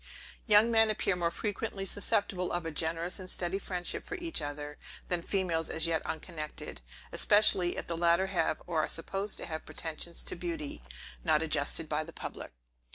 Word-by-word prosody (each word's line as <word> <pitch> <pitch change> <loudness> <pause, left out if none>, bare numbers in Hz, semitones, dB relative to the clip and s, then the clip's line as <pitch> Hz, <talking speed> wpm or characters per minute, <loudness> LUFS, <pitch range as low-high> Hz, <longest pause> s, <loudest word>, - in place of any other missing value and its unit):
Young 215 +2 +6
men 225 -1 +6
appear 205 -3 +1
more 170 -1 +1
frequently 200 +2 -3
susceptible 195 -2 0
of 175 -1 -2
a 165 - -2
generous 165 +4 0
and 185 -1 -7
steady 185 +2 0
friendship 180 -3 -2
for 410 - -5
each 340 - -1
other, 145 0 -5 0.3
than 175 -1 +1
females 170 -3 0
as 160 0 +2
yet 165 -1 +1
unconnected; 155 - -6 0.3
especially, 195 -4 +4
if - - -3
the 170 - -3
latter 170 +2 +3
have, 185 -4 0
or 165 -3 +1
are - - 0
supposed 195 +5 0
to - - -4
have, 160 -1 -5
pretensions 165 +1 -4
to - - 0
beauty, 165 - -4 0.4
not 155 +1 +3
adjusted 155 0 +2
by 150 +1 -1
the 165 +1 -11
public. - - -7
170 Hz, 175 wpm, -31 LUFS, 160-195 Hz, 0.4 s, Young